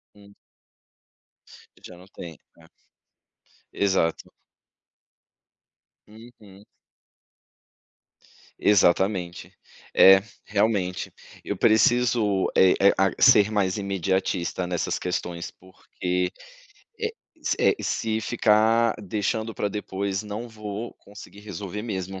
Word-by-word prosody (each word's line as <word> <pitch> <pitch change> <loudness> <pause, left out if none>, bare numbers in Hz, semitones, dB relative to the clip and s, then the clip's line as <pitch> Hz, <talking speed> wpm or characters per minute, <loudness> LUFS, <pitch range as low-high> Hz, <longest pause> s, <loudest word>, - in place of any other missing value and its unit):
Hum. 100 0 -18 1.5
Já 90 - -12
não 90 - -15
tem, 85 -5 -10 0.2
é. - - -18 1.1
Exato. 95 -5 0 1.8
Uhum. 105 -3 -16 1.9
Exatamente, 95 -2 +1 0.4
é, 95 0 +8 0.2
realmente, 100 -4 -1 0.3
eu 100 - -4
preciso 110 -2 +3
é 95 - +6
e - - +2 0.2
a 95 -1 +3
ser 110 -5 +6
mais 100 -2 0
imediatista 95 -2 -2
nessas 90 -1 -2
questões 90 -1 -4
porque, 90 -1 -4 0.7
eh 445 0 -2 0.5
eh, 410 - +3
se 110 -1 -1
ficar 110 0 +2
deixando 110 +3 -3
pra 105 - -2
depois 100 -1 -4
não 105 +3 -6
vou 105 +1 -7
conseguir 100 0 -14
resolver 105 0 -7
mesmo. 95 -4 -5
100 Hz, 90 wpm, -24 LUFS, 95-110 Hz, 1.9 s, é